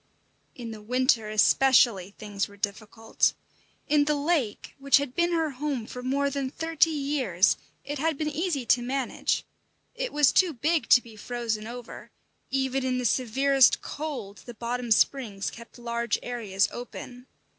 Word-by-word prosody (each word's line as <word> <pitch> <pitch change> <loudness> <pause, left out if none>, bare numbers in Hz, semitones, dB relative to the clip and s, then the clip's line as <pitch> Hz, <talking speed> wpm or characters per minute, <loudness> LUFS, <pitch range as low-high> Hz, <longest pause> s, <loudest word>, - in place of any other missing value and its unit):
In 235 -2 -7
the 215 -1 -9
winter 245 -1 +1
especially 215 -3 +4
things 205 -2 -3
were 205 - -16
difficult. 215 +2 -1 0.5
In 290 0 +3
the 300 0 +1
lake, 290 -7 -1
which 275 0 +5
had 280 -3 -3
been 345 +3 +1
her 325 -3 0
home 270 -3 -3
for 250 - -8
more 280 +2 0
than 275 -1 -2
thirty 325 +2 +1
years, 275 - +1 0.3
it 290 0 -5
had 320 0 0
been 310 - -2
easy 305 -3 -2
to 245 - +3
manage. 260 +1 -1 0.5
It - - -3
was 295 -2 +4
too 360 -4 +3
big 310 +5 0
to 245 - +7
be 225 -2 -13
frozen 225 -1 -3
over; 240 0 -9 0.4
even 265 0 0
in 255 -1 0
the 250 - -2
severest 265 +3 +3
cold 255 -10 -6
the 240 - -8
bottom 240 +1 -4
springs 220 -3 +1
kept 235 +1 -13
large 235 0 -1
areas 215 -6 0
open. 245 +1 -9
250 Hz, 155 wpm, -27 LUFS, 230-285 Hz, 0.5 s, to